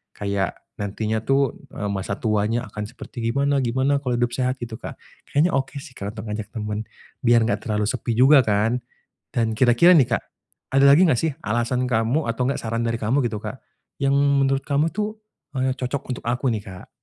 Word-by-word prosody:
kayak 100 -2 -1 0.2
nantinya 105 +2 -2
tuh, 135 +3 +1 0.2
eee, 105 - -3
masa 100 0 -3
tuanya 110 +2 0
akan 105 -1 -6
seperti 120 - -10
gimana 140 +4 +1
gimana 130 +3 +1
kalau 125 -3 -1
hidup 120 0 +1
sehat 130 +1 0
gitu 115 -1 -7
Kak. - - -7 0.3
Kayaknya 155 +5 +2
oke 135 -2 -1
sih - - -12
Kak, 105 -3 -6
untuk 110 -1 -6
ngajak 105 0 -4
temen, 105 0 -3 0.3
biar 120 -1 +4
nggak 105 -2 0
terlalu 105 -1 0
sepi 120 -1 -2
juga 135 +5 +7
kan. 110 +1 +2 0.5
Dan 115 -2 0
kira-kira 125 +9 +6
nih 135 -7 +4
Kak, - - -19 0.5
ada 135 +1 +5
lagi 140 +5 +7
nggak 155 -10 +4
sih 160 -1 0
alasan 120 +3 0
kamu 115 +4 +1
atau 125 +2 -1
nggak 135 - -1
saran 115 +1 -1
dari 115 - 0
kamu 115 +4 +1
gitu 110 -3 -4
Kak, 110 +5 -6 0.4
yang 140 -1 +2
menurut 140 -1 +3
kamu 145 +2 +1
itu, 215 +1 -3 0.4
eee, 130 0 +1
cocok 130 0 -3
untuk - - -10
aku 120 +3 -1
nih, 105 -2 -3
Kak? 95 -4 -11
120 Hz, 195 wpm, -23 LUFS, 110-135 Hz, 0.5 s, juga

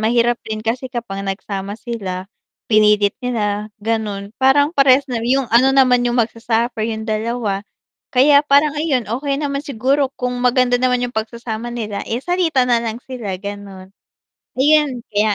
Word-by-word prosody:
mahirap 235 +2 +2
din 215 0 -4
kasi 235 +4 -3
kapag 195 -5 -5
nagsama 195 0 -4
sila, 195 -6 -5 0.4
pinilit 210 -2 +3
nila, 210 -3 -2
gano'n, 210 -2 -3
parang 285 +3 +3
parehas 275 0 +4
na 240 -3 -2
yung 260 0 +1
ano 255 +4 +4
naman 255 -2 +4
yung 240 0 +2
magsa-suffer 230 0 -1
yung 220 0 -4
dalawa. 215 -2 -2 0.5
Kaya 285 +3 +5
parang 290 +1 +3
ayun, 275 -8 0
okey 275 +5 -2
naman 280 -1 -2
siguro 275 +2 0
kung 250 0 -2
maganda 250 0 +3
naman 250 -1 +2
yung 245 - -5
pagsasama 230 +1 -4
nila, 215 -4 -4
eh, 235 +3 -2
salitan 325 -7 +1
na 240 -1 +3
lang 230 0 -4
sila 230 -8 -5
gano'n. 200 -2 -8 0.7
Ayun 285 -2 +2
kaya 210 0 +2
235 Hz, 155 wpm, -18 LUFS, 215-260 Hz, 0.7 s, Kaya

